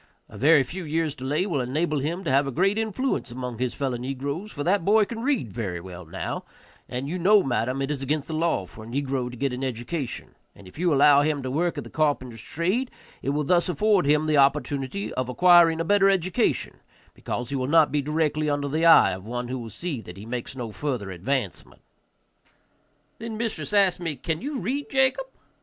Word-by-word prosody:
A - - -14
very 150 +1 +5
few 180 +8 -6
years' 160 -1 -1
delay 145 +6 -1
will 160 -9 -1
enable 150 +5 -1
him 165 +7 -3
to - - -1
have 140 +1 +3
a - - -2
great 195 - +1
influence 220 - -1
among 125 -1 -6
his 125 -2 -1
fellow 135 -3 -2
negroes, 140 - -4
for 145 - -4
that 190 +2 +2
boy 210 +3 +4
can 225 +2 -6
read 240 - -1
very 95 -5 -3
well 90 0 -10
now, 80 - -5 0.5
and 125 +2 -4
you 180 +5 -3
know, 200 +3 +5
madam, 130 +1 -1
it 135 - -2
is 140 -2 -3
against 145 +2 -1
the 160 - -5
law 160 - 0
for 110 +4 -12
a - - -11
negro 130 0 -2
to 125 - -10
get 135 +1 -1
an 125 +2 -4
education, 130 +2 -4 0.2
and 100 - -15
if 90 - -13
you 175 -1 +2
allow 145 0 +6
him 145 -2 0
to 130 - -3
work 170 +5 0
at - - -3
the - - -11
carpenter's 130 -7 -1
trade 190 - -1 0.3
it - - -2
will 150 +2 0
thus 175 +4 +2
afford 195 0 +2
him 150 +1 +3
the 155 -1 +2
opportunity 140 +5 +1
of 130 -1 -2
acquiring 170 +3 +5
a 165 - -1
better 200 +1 +4
education, 185 -2 0 0.3
because 120 0 -5
he - - -1
will 130 -1 -1
not 160 +1 +4
be 150 - +1
directly 150 +1 0
under 145 -1 -1
the 155 +4 -1
eye 165 - +7
of 95 0 -6
one 120 +2 -4
who 130 0 -3
will 115 -2 -7
see 145 - -5
that 90 -3 -11
he 100 - -9
makes 120 +2 -5
no 120 -4 -5
further 120 -6 -3
advancement." 100 +3 -3 1.4
Then 225 -1 -5
mistress 225 -2 -3
asked 195 -4 +3
me, 165 -4 -3
"Can 160 +5 -3
you 285 +2 -3
read, 265 +9 -3
Jacob?" 265 - +1
145 Hz, 215 wpm, -25 LUFS, 125-175 Hz, 1.4 s, eye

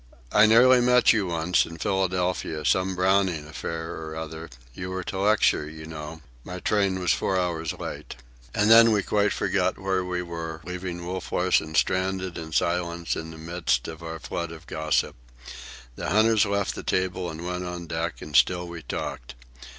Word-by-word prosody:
"I 105 +1 +6
nearly 125 +3 +6
met 125 0 +5
you, 105 -4 0
once, 85 +1 +2
in 85 - -8
Philadelphia, 90 -4 -1
some 95 0 +2
Browning 95 -4 +2
affair 80 +1 -5
or 80 0 -7
other—you 80 -1 -8
were 95 0 -4
to 95 - -5
lecture, 100 -7 +2
you 80 0 -10
know. 80 0 -8 0.2
My 90 0 -7
train 100 -1 +1
was 90 -1 +1
four 95 -1 0
hours 85 -3 -1
late." - - -7 0.4
And 105 +2 +3
then 115 0 +8
we 100 -2 +1
quite 105 0 +1
forgot - - 0
where 95 -1 -1
we 90 0 -3
were, 85 -2 -6
leaving 90 0 -5
Wolf 90 0 -5
Larsen 90 -3 +1
stranded 95 +3 0
and 80 -1 -7
silent 85 +1 0
in 80 - -6
the 80 - -10
midst 80 -6 -1
of 80 +1 -8
our 80 0 -6
flood 80 +3 -5
of 80 0 -11
gossip. 80 -1 0 0.8
The 85 +2 -4
hunters 110 +2 +4
left 100 -1 0
the - - -6
table 95 -1 -1
and 80 +1 -7
went 90 0 -3
on 90 -1 -5
deck, 80 +1 -4
and 75 -1 -8
still 90 +8 +4
we 85 -1 -8
talked. - - -5
90 Hz, 175 wpm, -25 LUFS, 80-95 Hz, 0.8 s, then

